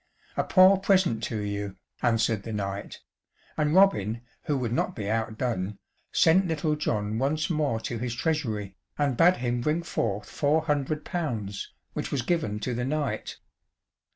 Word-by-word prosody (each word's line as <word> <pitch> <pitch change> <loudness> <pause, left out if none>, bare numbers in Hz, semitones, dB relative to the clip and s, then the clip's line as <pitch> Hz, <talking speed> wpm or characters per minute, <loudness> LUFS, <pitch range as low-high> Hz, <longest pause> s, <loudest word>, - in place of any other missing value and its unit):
"A - - +1
poor 185 0 +6
present 185 - +3
to 110 - -3
you," 100 -1 -3 0.3
answered 115 -3 +2
the 115 - -7
knight, 100 -1 -4 0.5
and 150 +1 +1
Robin, 115 - +4 0.2
who 150 -4 +1
would 120 -3 -1
not - - 0
be 105 -3 -4
outdone, 110 -2 -1 0.3
sent 185 +3 +4
Little 155 -1 0
John 110 -7 -1
once 150 +6 0
more 150 -8 +1
to 115 0 -4
his 120 0 -3
treasury, 115 -9 -1 0.2
and 145 -3 +1
bade 175 +7 +5
him 120 -1 -1
bring 155 +6 0
forth 105 -10 -2
four 155 +2 +1
hundred 150 0 -1
pounds, 115 - -3 0.2
which - - -4
was 135 -4 0
given 115 -9 0
to 125 +3 -2
the 120 +1 -2
knight. 145 0 -2
125 Hz, 155 wpm, -27 LUFS, 110-155 Hz, 0.5 s, poor